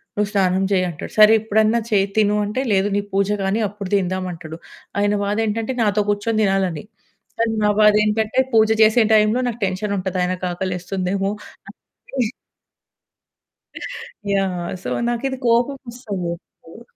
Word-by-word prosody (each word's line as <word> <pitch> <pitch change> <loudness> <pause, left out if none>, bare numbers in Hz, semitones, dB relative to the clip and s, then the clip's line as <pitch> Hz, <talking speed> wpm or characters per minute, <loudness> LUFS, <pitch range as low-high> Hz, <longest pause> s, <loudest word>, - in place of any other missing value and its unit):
నువ్వు 210 -1 0
స్నానం 190 -1 +2
చెయ్యి" 185 -1 +2
అంటాడు. 160 - -8
సరే 215 +1 +8
ఇప్పుడన్నా 220 +1 +2
చేయి, 200 -1 +3
తిను 210 -1 +3
అంటే, 210 +6 -2
"లేదు 195 +1 +2
నీ - - +1
పూజ 195 0 +1
గాని 195 +4 0
అప్పుడు 200 -1 -8
తిందాం" 185 -1 -1
అంటడు. 160 0 -9 0.4
ఆయన 205 0 +2
బాదేంటంటే 220 +4 -1
నాతో 210 -1 +2
కూర్చొని 215 +2 0
తినాలని. 195 -3 0 0.5
కానీ 230 -1 +1
నా 210 - +4
బాదేంటంటే 210 +3 +3
పూజ 220 -1 +5 0.2
చేసే 220 +2 +5
టైంలో 215 +3 +3
నాకు 235 - -6
టెన్షనుంటది 190 -1 -2
ఆయనకి 185 +1 -2
ఆకలేస్తుందేమో! 185 +2 -2 0.8
అని. 250 -4 +1 2.0
యాహ్! 185 -3 -1
సో, - - -6 0.2
నాకిది 265 +3 -2
కోపమొస్తది 235 -5 -1
ఎప్పుడు. 170 +4 -16
205 Hz, 130 wpm, -20 LUFS, 190-220 Hz, 2.0 s, సరే